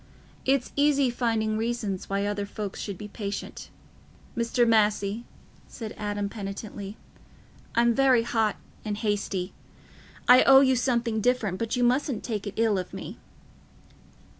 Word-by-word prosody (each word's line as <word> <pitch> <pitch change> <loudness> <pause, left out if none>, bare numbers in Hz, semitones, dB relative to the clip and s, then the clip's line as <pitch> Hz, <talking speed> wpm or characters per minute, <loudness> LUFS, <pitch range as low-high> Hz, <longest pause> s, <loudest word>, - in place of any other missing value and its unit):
It's 265 -1 +1
easy 285 -3 +3
finding 220 -3 0
reasons 225 -5 -2
why 200 +1 0
other 205 0 -2
folks 205 -1 -6
should 200 -3 -5
be 210 - -7
patient." 205 -1 -6 0.7
"Mr. 235 +1 +2
Massey," 215 0 +2 0.4
said 225 -3 -7
Adam 205 -1 -2
penitently, 200 0 -7 0.8
"I'm 235 0 +4
very 260 -2 +4
hot 225 -3 +1 0.3
and 210 -1 -3
hasty. 205 -4 -2 0.7
I 250 +1 +9
owe 270 0 +8
you 260 -1 +4
something 235 -3 0
different; 225 -6 +1
but 230 +2 -1
you 245 - +1
mustn't 250 0 +1
take 215 -3 -3
it 200 - -6
ill 220 -3 +2
of 180 - -6
me." - - -8
220 Hz, 140 wpm, -27 LUFS, 205-240 Hz, 0.8 s, I